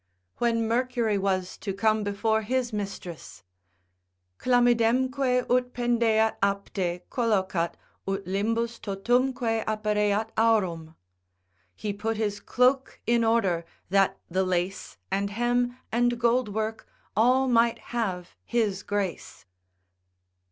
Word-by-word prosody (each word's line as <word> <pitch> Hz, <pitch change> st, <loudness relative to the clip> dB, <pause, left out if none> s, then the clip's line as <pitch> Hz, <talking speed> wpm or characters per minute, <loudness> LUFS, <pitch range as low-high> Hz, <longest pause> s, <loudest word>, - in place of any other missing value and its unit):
When 230 Hz, -1 st, +1 dB
Mercury 235 Hz, -3 st, +1 dB
was 190 Hz, -2 st, -1 dB
to 195 Hz, -, -3 dB
come 215 Hz, +1 st, +2 dB
before 220 Hz, +2 st, 0 dB
his 245 Hz, +1 st, -1 dB
mistress, 195 Hz, -5 st, -6 dB, 1.0 s
———Chlamydemque 250 Hz, +1 st, +2 dB
ut 250 Hz, 0 st, +1 dB
pendeat 230 Hz, -2 st, +2 dB
apte 195 Hz, -3 st, -1 dB
Collocat, 190 Hz, -8 st, 0 dB, 0.3 s
ut 195 Hz, 0 st, -2 dB
limbus 225 Hz, +5 st, -1 dB
totumque 235 Hz, +2 st, 0 dB
appareat 210 Hz, 0 st, 0 dB
aurum. 180 Hz, -8 st, +1 dB, 0.8 s
He 210 Hz, -1 st, -3 dB
put 220 Hz, +2 st, -2 dB
his 205 Hz, -2 st, -1 dB
cloak 260 Hz, +2 st, +1 dB
in 235 Hz, 0 st, +3 dB
order, 210 Hz, -7 st, +2 dB, 0.3 s
that 195 Hz, -1 st, +3 dB
the 185 Hz, +2 st, 0 dB
lace. 185 Hz, +1 st, -2 dB
And 200 Hz, +1 st, 0 dB
hem, 245 Hz, +3 st, 0 dB
and 240 Hz, +1 st, +1 dB
gold 240 Hz, -1 st, +2 dB
work, 220 Hz, +1 st, -3 dB, 0.3 s
all 255 Hz, +4 st, +4 dB
might 235 Hz, -1 st, +3 dB, 0.2 s
have 190 Hz, -7 st, -2 dB
his 215 Hz, -5 st, 0 dB
grace. 195 Hz, -, -4 dB
220 Hz, 110 wpm, -27 LUFS, 200-240 Hz, 1.0 s, all